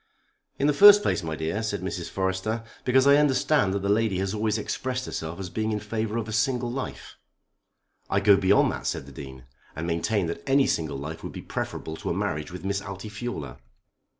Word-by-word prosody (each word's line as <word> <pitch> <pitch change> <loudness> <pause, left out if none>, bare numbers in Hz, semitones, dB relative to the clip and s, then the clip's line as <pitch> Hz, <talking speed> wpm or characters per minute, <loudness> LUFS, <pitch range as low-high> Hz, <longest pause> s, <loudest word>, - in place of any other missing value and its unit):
"In 140 - 0
the 150 - +4
first 205 +6 +9
place, - - +1
my 80 -2 -4
dear," 80 +8 -2
said 110 - -2
Mrs. - - -4
Forrester, 95 +4 -2 0.2
"because 130 +1 +4
I 140 +1 +7
understand 145 -6 +3
that 100 - -2
the - - 0
lady 105 -2 +2
has 95 +1 -1
always 110 0 0
expressed 130 +4 -3
herself 80 +3 -5
as 95 -2 -6
being 110 0 -1
in 105 - -1
favour 110 +1 -3
of 115 -2 -3
a - - -5
single 120 +2 0
life." 130 +1 -6 0.9
"I 100 - +2
go 100 0 +6
beyond 100 +1 +4
that," - - -5
said - - -2
the 70 - -12
Dean, 65 -1 -10 0.3
"and 80 - -4
maintain 85 +4 0
that 85 0 -4
any 135 0 +5
single 80 -4 -1
life 75 +4 -6
would - - -7
be - - -7
preferable 80 - -4
to - - -5
a - - -1
marriage 75 +1 -2
with 90 +1 -8
Miss 100 0 -1
Altifiorla." 100 - -6
105 Hz, 205 wpm, -26 LUFS, 85-115 Hz, 0.9 s, first